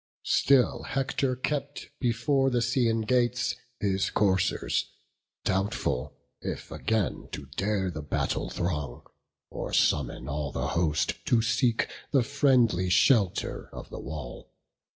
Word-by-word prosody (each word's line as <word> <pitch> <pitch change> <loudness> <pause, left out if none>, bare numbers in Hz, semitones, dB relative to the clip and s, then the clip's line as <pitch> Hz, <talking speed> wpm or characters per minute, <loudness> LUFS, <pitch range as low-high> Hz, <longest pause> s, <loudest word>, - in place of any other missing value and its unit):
Still 135 -3 +3
Hector 135 -1 -1
kept 140 +2 -3
before 135 +3 +2
the 125 - 0
Scaean 115 -2 +1
gates 125 +1 +1 0.2
His 95 -1 +1
coursers; 95 -2 +1 0.6
doubtful, 95 -9 -1 0.2
if - - -5
again 110 -5 -1
to 70 - -5
dare 95 -2 0
The 80 - -5
battle 75 - -1
throng, 75 -8 -3 0.5
or - - -5
summon 65 -2 +1
all 75 -1 -3
the 65 +2 -2
host 85 -3 0
To 115 -2 +3
seek 120 0 +2 0.2
the 135 -4 +4
friendly 125 -9 +3
shelter 100 +1 +2
of - - -9
the - - -6
wall. 70 -6 -7
110 Hz, 120 wpm, -28 LUFS, 85-125 Hz, 0.6 s, the